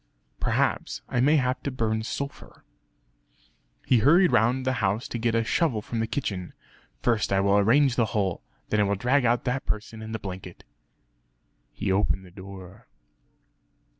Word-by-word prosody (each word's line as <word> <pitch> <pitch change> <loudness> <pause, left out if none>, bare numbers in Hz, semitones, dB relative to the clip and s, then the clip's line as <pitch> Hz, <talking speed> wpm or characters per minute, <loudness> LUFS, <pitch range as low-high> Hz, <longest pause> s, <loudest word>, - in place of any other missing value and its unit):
Perhaps - - 0
I 125 - -1
may 145 +5 +4
have 130 -2 +1
to 140 - -2
burn 110 -4 -1
sulphur." 140 +5 -6 1.2
He 125 - +4
hurried 170 - +5
round 125 +4 +2
the 130 - +1
house 100 +4 0
to 120 - -4
get 115 0 0
a 115 - +2
shovel 125 -1 +1
from 115 - -4
the 110 - 0
kitchen 95 -10 -4 0.5
"First 115 -4 +1
I 95 - +3
will 100 +1 +3
arrange 120 +5 +3
the 115 - +3
hole 95 -4 0 0.3
then 105 - +1
I - - +5
will 100 0 +1
drag 125 +6 +2
out 120 +1 +2
that 125 +2 -2
person 110 +1 -4
in 110 0 -7
the 110 - -2
blanket...." 95 -3 -8 1.1
He - - -2
opened 95 -1 +1
the 90 - -15
door.... 95 0 -11
110 Hz, 165 wpm, -26 LUFS, 100-125 Hz, 1.2 s, hurried